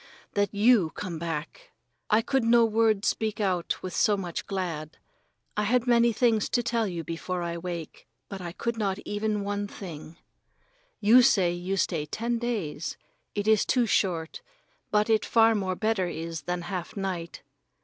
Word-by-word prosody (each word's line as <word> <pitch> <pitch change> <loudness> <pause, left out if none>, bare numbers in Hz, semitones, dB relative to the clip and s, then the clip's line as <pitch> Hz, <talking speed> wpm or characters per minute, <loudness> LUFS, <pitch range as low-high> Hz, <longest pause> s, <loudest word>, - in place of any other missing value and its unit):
That 205 0 +1
you 210 -4 +4
come 175 -5 -5
back! 165 - -5 0.4
I 220 +1 +4
could 270 0 +1
no 230 0 +5
word 220 -2 +2
speak 220 -2 0
out 185 -4 -1
with 185 -2 -5
so 205 +3 +3
much 175 -4 -5
glad. 170 -6 -4 0.6
I 210 - +1
had 235 +3 +2
many 235 -1 +4
things 225 -1 +2
to 240 - +1
tell 230 -1 0
you 170 -3 -4
before 175 +2 -4
I 170 0 -3
wake, 170 -2 -6 0.2
but 195 -1 -7
I 175 -1 -5
could 235 +5 -3
not 195 -2 0
even 210 0 -1
one 205 0 -2
thing. 165 -5 -9 0.8
You 225 +5 +7
say 190 -7 +4
you 180 +3 -3
stay 160 -5 0
ten 235 +8 -2
days. 205 -10 -3 0.4
It 205 0 -2
is 220 -2 +5
too 250 -2 +2
short, 175 -6 0 0.5
but 210 0 +2
it 220 -1 +3
far 225 -1 +4
more 190 -3 -1
better 215 -3 0
is 165 -1 -5
than 175 -1 -1
half 180 +2 -5
night. 185 -4 -4
200 Hz, 170 wpm, -27 LUFS, 175-225 Hz, 0.8 s, You